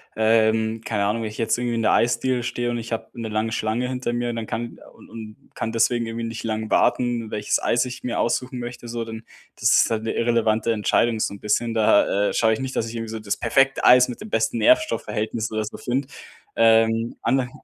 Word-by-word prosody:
Ähm, 110 0 +2
keine 105 -3 -1
Ahnung, 115 +2 -1
wenn 110 - -3
ich 105 - -11
jetzt 115 +1 0
irgendwie 120 -1 -2
in 115 - -1
der - - +3
Eisdiele 120 +1 +1
stehe 120 0 -2
und 120 - -2
ich 115 0 -5
habe 115 - -4
'ne 115 - -4
lange 110 +1 -1
Schlange 115 +2 -1
hinter 125 -2 -3
mir, 120 0 -1
dann 115 -1 -5
kann 120 +1 -5
u - - -22
und 110 -2 -9 0.2
kann 115 0 -4
deswegen 115 +1 +1
irgendwie 115 +1 -5
nicht 115 0 -5
lang 110 0 -3
warten, 120 -3 +1
welches 105 -1 -1
Eis 120 - +2
ich 125 0 -7
mir 125 - -2
aussuchen 125 +1 -1
möchte 120 0 -7
so, 115 0 -4
d 110 0 -8 0.4
das - - +3
ist - - +4
halt 110 0 -1
'ne 115 - -2
irrelevante 115 -1 +1
Entscheidung 115 +1 +1
so 100 - -1
'n 100 - -11
bisschen. 115 +2 0
Da, 105 -2 +3
äh, - - -4
schaue 110 -1 +3
ich 110 - -3
nicht, 130 0 -4
dass 115 - 0
ich 115 - -7
irgendwie 115 -1 -5
so 110 - -5
das 105 -1 -2
perfekte 135 +3 +1
Eis 125 0 +7
mit 125 - -8
dem 215 - -8
besten 240 - 0
Nährstoffverhältnis 115 - +1
oder 110 0 -2
so 105 - -8
finde. 130 +2 -2 0.5
Ähm, 115 0 +3
ande 130 -2 +1
115 Hz, 230 wpm, -23 LUFS, 110-120 Hz, 0.5 s, Eis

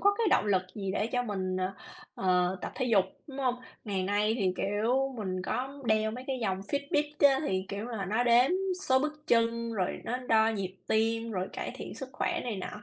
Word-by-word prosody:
có 405 0 +4
cái 460 - +2
động - - +4
lực 190 -3 +3
gì 195 -3 -3
để 210 - 0
cho 245 +1 0
mình, 190 -5 -2
ờ, 185 +1 -1 0.4
ờ, 180 0 +2
tập - - -4
thể 255 - -1
dục, 205 -6 +4 0.2
đúng 275 -3 -9
hông? 255 -3 +2 0.3
Ngày 195 -4 -1
nay 205 +3 +1
thì, 190 -3 +2
kiểu, 235 +7 +1
mình 185 -3 -2
có 270 +7 -3
đeo 215 -1 +3
mấy 250 +3 -7
cái 265 -1 -2
dòng 190 -2 0
Fitbit 285 +6 -1 0.2
á 270 - +3
thì, 190 0 0
kiểu, 200 +2 -4
là 225 -5 -3
nó 215 +6 +1
đếm 245 +2 +5 0.4
số 260 0 +6
bước 300 +2 -3
chân, 230 -2 +2
rồi 190 -5 -1
nó 245 - -1
đo 225 -3 +3
nhịp 195 -4 -3
tim, 225 +1 +1
rồi 185 -3 -2
cải - - -4
thiện - - -7
sức 265 - -6
khỏe - - -1
này 230 -5 -2
nọ. 210 +2 -6
220 Hz, 220 wpm, -30 LUFS, 195-255 Hz, 0.4 s, số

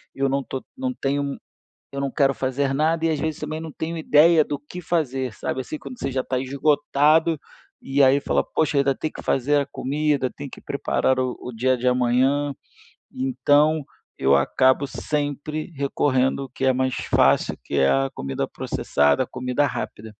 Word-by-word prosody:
eu 135 0 +1
não 140 +1 +1
estou 130 0 -6
não 260 -1 -2
tenho 140 - -2 0.5
eu 140 0 -4
não 140 - -1
quero 135 -2 +2
fazer 135 +1 -1
nada, 160 +3 +1
e - - +3
às 155 - -1
vezes 160 -1 -2
também, 155 +1 -4
não 160 -1 -7
tenho 165 +3 -4
ideia 160 +1 +5
do 145 - -4
que 175 +5 -10
fazer, 135 -7 -1
sabe, 130 +5 -4
assim, 155 - -6
quando 250 - -10
você 135 - -2
já 130 0 0
está 130 -1 -2
esgotado, 145 +3 +2 0.4
e 140 +1 0
aí 135 +2 +5
fala: - - 0
"Poxa, 150 -2 0
ainda 135 -1 +2
tem 155 - -4
que - - -9
fazer 140 +3 +1
a - - -2
comida, 140 -2 -1
tem 140 -1 -7
que - - -11
preparar 130 -1 0
o 130 -1 -1
o 125 - -7
dia 130 +3 +1
de 125 +1 -2
amanhã". 130 +3 +2 0.6
Então, 145 +4 +2 0.3
eu 70 +1 +4
acabo 130 - +3
sempre 150 +3 -3
recorrendo 135 -1 +1
ao 135 - -9
que 130 +2 -3
é 130 - +4
mais 130 0 0
fácil, - - +2
que - - -5
é 70 - +4
a 70 0 +2
comida 70 0 -3
processada, 75 - 0
comida 125 +3 -1
rápida. 110 0 -6
140 Hz, 185 wpm, -23 LUFS, 130-150 Hz, 0.6 s, ideia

